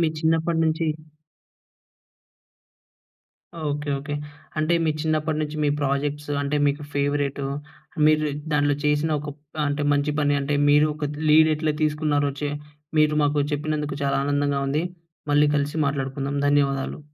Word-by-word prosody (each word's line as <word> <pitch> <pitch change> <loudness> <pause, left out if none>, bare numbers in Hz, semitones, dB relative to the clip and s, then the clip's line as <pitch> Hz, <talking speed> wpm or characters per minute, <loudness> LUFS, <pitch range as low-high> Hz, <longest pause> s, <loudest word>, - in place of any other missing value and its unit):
మీ 165 - +3
చిన్నప్పటి 160 +1 +1
నుంచి 160 +1 0 2.8
okay, 145 0 -2
okay. 145 +1 -5 0.4
అంటే 155 +2 +2
మీ 155 - +3
చిన్నప్పటి 155 0 0
నుంచి 150 0 -3
మీ 145 - +3
ప్రాజెక్ట్స్ 145 +1 -1
అంటే 145 +1 -1
మీకు 145 +1 -1
ఫేవరెట్, 145 0 0 0.7
మీరు 155 0 +3 0.3
దాంట్లో 145 -1 +2
చేసిన 150 +1 +2
ఒక 150 +1 -6
ప 145 +1 -33
అంటే 145 +1 -1
మంచి 145 +1 +1
పని 145 -1 +2
అంటే 140 +1 -1
మీరు 150 +1 +6
ఒక 150 -1 -3 0.2
లీడ్ 155 +1 +6
ఎట్లా 155 0 0
తీసుకున్నారో 150 -1 +1
చే 145 - 0 0.5
మీరు 150 0 +4
మాకు 145 0 +1
చెప్పినందుకు 150 -1 -2
చాలా 140 - +1
ఆనందంగా 145 0 +1
ఉంది. 150 +4 0 0.5
మళ్ళీ 145 +1 +5
కలిసి 145 +1 -1
మాట్లాడుకుందాం, 140 0 -2
ధన్యవాదాలు. 140 -1 +1
145 Hz, 135 wpm, -24 LUFS, 145-155 Hz, 2.8 s, మీరు